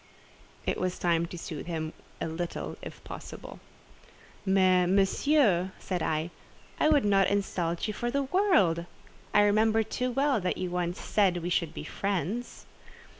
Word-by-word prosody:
It - - -1
was 185 -1 -1
time 170 -1 +1
to 175 - -8
soothe 160 -2 -6
him 160 -2 -3 0.3
a - - -2
little 170 +2 -4
if - - -9
possible. - - -9 0.9
"Mais, 185 -2 +4
Monsieur," 195 - +3
said 180 -3 -3
I, 160 +2 -1 0.5
"I 305 - +4
would 290 -7 +4
not 195 -2 +4
insult 180 -4 -1
you 215 - -2
for 240 +4 -2
the 280 +3 0
world. 235 - +2 0.4
I 210 - +5
remember 220 +2 +3
too 250 +4 -2
well 270 -2 +1
that 180 - -1
you 180 -1 -3
once 180 0 -2
said 195 -4 +2
we 175 - -2
should 170 -3 0
be - - -5
friends." 200 +7 -3
190 Hz, 155 wpm, -29 LUFS, 175-220 Hz, 0.9 s, I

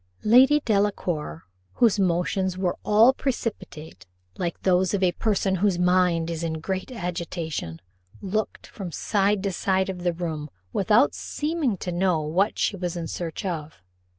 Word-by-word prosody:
Lady 260 +7 +6
Delacour, 185 - -1 0.3
whose 225 -3 +3
motions 185 +1 0
were 185 -2 0
all 220 +5 +5
precipitate, 160 - -5 0.3
like 170 -2 -3
those 185 +1 +2
of 195 - -1
a 180 - +4
person 195 -1 0
whose 195 -1 +2
mind 180 -2 +2
is 165 0 -4
in 165 -1 -1
great 190 +8 -4
agitation, 170 - -4 0.4
looked 210 +3 -3
from 190 -5 -8
side 200 +2 +1
to 200 - 0
side 190 +1 0
of 180 -2 -5
the 175 0 +1
room, 160 -3 -4 0.2
without 210 +7 +3
seeming 300 - -2
to 180 - -4
know 175 -1 +1
what 175 +7 0
she - - 0
was 175 -2 -4
in 165 -1 -4
search 170 +3 -5
of. 160 -4 -5
185 Hz, 150 wpm, -25 LUFS, 170-205 Hz, 0.4 s, Lady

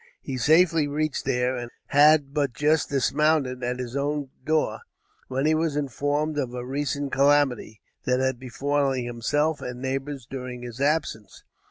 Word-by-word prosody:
He 135 - -5
safely 160 +3 +4
reached 150 +1 -2
there 125 +1 +1
and 120 -1 -5 0.2
had 145 -1 +5
but 140 -4 0
just 150 +2 +1
dismounted 140 -1 +1
at 125 +1 -1
his 125 0 -5
own 145 -1 -2
door, 155 +2 0 0.5
when 135 +2 -1
he 155 - +4
was 155 -1 0
informed 145 +2 -1
of 125 -3 -3
a 125 0 -5
recent 140 +1 -2
calamity 140 -6 +2 0.2
that 125 0 +2
had 130 -2 0
befallen 135 0 -1
himself 145 +6 0
and 125 0 -6
neighbors 135 0 -4
during 125 -2 -6
his 120 +1 -7
absence. 140 -9 -1
140 Hz, 155 wpm, -25 LUFS, 125-150 Hz, 0.5 s, had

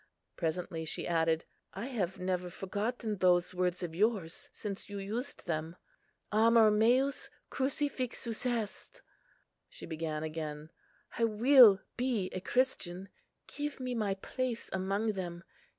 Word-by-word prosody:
Presently 165 -1 -2
she 160 - -3
added, 165 -1 +1 0.3
"I 195 +4 -4
have 195 -9 -2
never 180 -1 -1
forgotten 210 +4 -3
those 180 -1 +3
words 180 0 0
of 170 -2 -4
yours 195 -3 0
since 205 -1 -6
you 205 - -5
used 225 +8 -4
them; 160 0 -2 0.6
'Amor 225 0 +6
meus 245 +6 +2 0.2
crucifixus 260 -4 -2
est.' 230 -4 -3 0.4
" - - -45
She - - -10
began 155 -1 -3
again, 155 -1 -5 0.5
"I 230 - +5
will 225 -2 +7 0.2
be 240 -6 0
a 185 - -3
Christian; 195 -6 -1 0.4
give 295 -1 -5
me 255 -1 -3
my 210 -4 0
place 245 +4 -3
among 195 +3 0
them. 175 -3 -5
200 Hz, 130 wpm, -32 LUFS, 175-235 Hz, 0.6 s, will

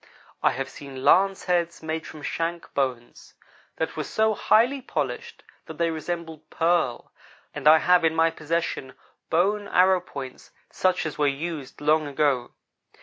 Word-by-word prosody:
I - - +4
have 135 0 -3
seen 135 -1 -9
lance 195 0 +4
heads, 170 -2 -1
made 160 0 -4
from 155 -2 -11
shank 165 +3 -3
bones, 125 -4 -3 0.4
that - - -3
were - - -2
so 220 0 +1
highly 245 +6 +3
polished 460 - -4 0.2
that - - -9
they 170 -1 +1
resembled 160 -1 -6
pearl, 165 -7 0 0.4
and 150 0 -2
I 155 +1 +9
have 180 +1 +4
in 160 0 +2
my 165 0 +3
possession 160 -4 -3 0.3
bone 200 +5 +1
arrow 185 -1 +4
points 135 -7 -9 0.2
such 185 -2 +1
as 155 - -5
were 145 - +3
used 145 -1 -4
long 155 +1 +2
ago. 140 -3 0
160 Hz, 150 wpm, -25 LUFS, 145-180 Hz, 0.4 s, I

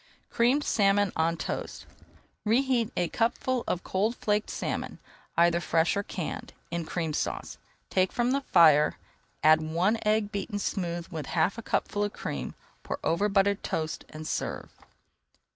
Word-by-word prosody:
CREAMED 250 +5 +3
SALMON 200 -4 +3
ON 165 +1 +1
TOAST - - -5 0.6
Reheat 235 0 +2
a 175 - +2
cupful 245 +2 0
of 180 - -1
cold 210 +5 0
flaked 210 -2 0
salmon, - - -3 0.4
either 170 0 +4
fresh 165 0 +2
or 200 - +1
canned, 180 -4 -5 0.2
in 170 -1 -2
Cream 165 -2 -2
Sauce. - - -3 0.3
Take 185 0 +2
from 240 +1 +1
the 275 +1 +1
fire, 155 - +5 0.5
add 155 +1 +6
one 175 +8 +1
egg 210 -1 +1
beaten 205 0 -3
smooth 175 -4 -2
with 160 -5 -5
half 175 +7 +1
a - - -4
cupful 205 -2 -1
of 205 - -2
cream, - - -5 0.3
pour - - -4
over 200 +6 +1
buttered 200 0 +2
toast, 160 0 -3
and 155 0 -8
serve. - - -3
195 Hz, 150 wpm, -28 LUFS, 165-215 Hz, 0.6 s, add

